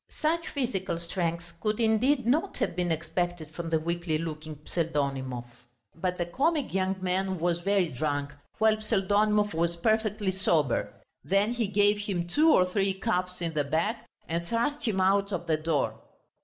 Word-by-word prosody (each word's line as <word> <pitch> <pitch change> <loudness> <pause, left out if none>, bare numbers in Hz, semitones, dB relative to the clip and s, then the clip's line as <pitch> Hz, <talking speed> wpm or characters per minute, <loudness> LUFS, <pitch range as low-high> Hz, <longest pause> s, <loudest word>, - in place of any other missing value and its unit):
Such 330 +2 +1
physical 235 - -2
strength 170 0 -3
could 215 +2 -1
indeed 235 +4 +3
not 310 +11 +1
have - - -1
been 175 -1 0
expected 165 0 -2
from 165 0 -5
the 160 -1 +2
weakly 170 0 -1
looking 155 -1 -5
Pseldonimov. 140 -7 -2 0.5
But 180 +2 -2
the 175 - 0
comic 285 - 0
young 190 0 +1
man 190 +1 0
was 170 0 0
very 190 -1 +2
drunk, 145 +1 -2 0.2
while 220 0 +4
Pseldonimov 210 0 +2
was 170 +1 0
perfectly 215 +1 +1
sober. 165 - +1 0.3
Then 200 +4 +2
he 235 -3 0
gave 205 +1 +3
him 190 -4 -2
two 305 - +4
or 180 - +5
three 195 +1 0
cuffs 180 -1 -1
in 165 -1 -2
the 150 -1 +1
back, 205 - -1 0.2
and 170 +1 -2
thrust 280 - 0
him 200 -4 +1
out 200 +2 +3
of 175 -3 -3
the 160 -2 +1
door. 155 -2 -1
185 Hz, 165 wpm, -28 LUFS, 165-210 Hz, 0.5 s, or